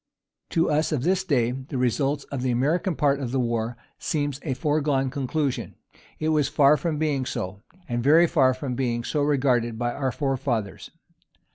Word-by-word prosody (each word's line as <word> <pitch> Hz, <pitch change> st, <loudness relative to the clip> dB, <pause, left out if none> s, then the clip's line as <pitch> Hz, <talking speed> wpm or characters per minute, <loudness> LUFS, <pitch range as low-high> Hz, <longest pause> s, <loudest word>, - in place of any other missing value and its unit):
To 165 Hz, 0 st, +2 dB
us 155 Hz, +1 st, +1 dB
of 140 Hz, -5 st, -1 dB
this 190 Hz, +3 st, +2 dB
day, 125 Hz, -9 st, +1 dB
the 130 Hz, +2 st, -6 dB
result 135 Hz, +3 st, 0 dB
of 140 Hz, -3 st, -3 dB
the 130 Hz, -, 0 dB
American 155 Hz, +9 st, +1 dB
part 140 Hz, -1 st, +2 dB
of 130 Hz, -4 st, -4 dB
the 135 Hz, -, 0 dB
war 120 Hz, -1 st, -1 dB, 0.2 s
seems 145 Hz, -3 st, -2 dB
a 135 Hz, -5 st, -2 dB
foregone 145 Hz, -2 st, 0 dB
conclusion. 140 Hz, 0 st, -2 dB, 0.4 s
It 155 Hz, -, -1 dB
was 150 Hz, -3 st, +2 dB
far 145 Hz, 0 st, +5 dB
from 150 Hz, +1 st, -2 dB
being 145 Hz, -3 st, 0 dB
so; 95 Hz, -5 st, -5 dB, 0.3 s
and 120 Hz, -3 st, -1 dB
very 160 Hz, +5 st, +6 dB
far 135 Hz, -6 st, +3 dB
from 130 Hz, 0 st, -4 dB
being 120 Hz, -2 st, -1 dB
so 150 Hz, +4 st, -1 dB
regarded 130 Hz, -5 st, +1 dB
by 120 Hz, 0 st, -1 dB
our 135 Hz, -2 st, -1 dB
forefathers. 130 Hz, -8 st, -2 dB
135 Hz, 175 wpm, -25 LUFS, 125-150 Hz, 0.4 s, very